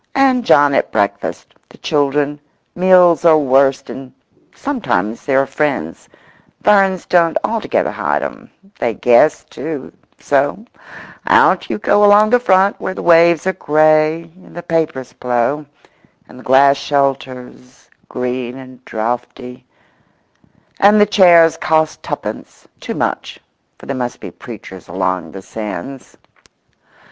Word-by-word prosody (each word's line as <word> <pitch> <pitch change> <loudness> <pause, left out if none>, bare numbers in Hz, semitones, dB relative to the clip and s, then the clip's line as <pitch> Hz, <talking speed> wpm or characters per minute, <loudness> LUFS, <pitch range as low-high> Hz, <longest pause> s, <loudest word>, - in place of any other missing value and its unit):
And 265 -2 +2
John 145 -9 +4
at - - 0
breakfast—the 100 -2 -4
children—meals 150 +5 +1
are 165 -2 +5
worst, 135 -1 +1
and 130 -1 -10 0.4
sometimes 115 - -3
there 135 -1 +2
are - - -4
friends—ferns 150 - -2
don't 170 -2 +2
altogether 225 -1 -1
hide - - -2
'em—they 195 - -7
guess, 125 +8 +3
too; 150 -5 -8 0.2
so 145 +9 -1 0.6
out - - +3
you - - -2
go 210 0 +2
along 205 +1 +5
the 245 - +4
front, 195 -3 +2
where 185 - -4
the - - -7
waves 170 -1 +4
are 190 - 0
grey, 155 0 +2 0.2
and - - -18
the 175 - -8
papers 155 -6 -3
blow, 125 +4 -2 0.6
and 125 - -15
the - - -14
glass 140 +2 +4
shelters 130 -2 -4 0.2
green 125 0 -4
and 130 -1 -14
draughty, 125 +2 -6 1.1
and 205 +2 +5
the 210 - +6
chairs 175 -5 +4
cost 155 0 0
tuppence—too - - -8
much—for - - -7
there 140 - -4
must 125 -1 -5
be - - -9
preachers 95 -1 -12
along 90 -1 -3
the 95 -1 -10
sands. 115 +6 -8
145 Hz, 120 wpm, -16 LUFS, 125-175 Hz, 1.1 s, the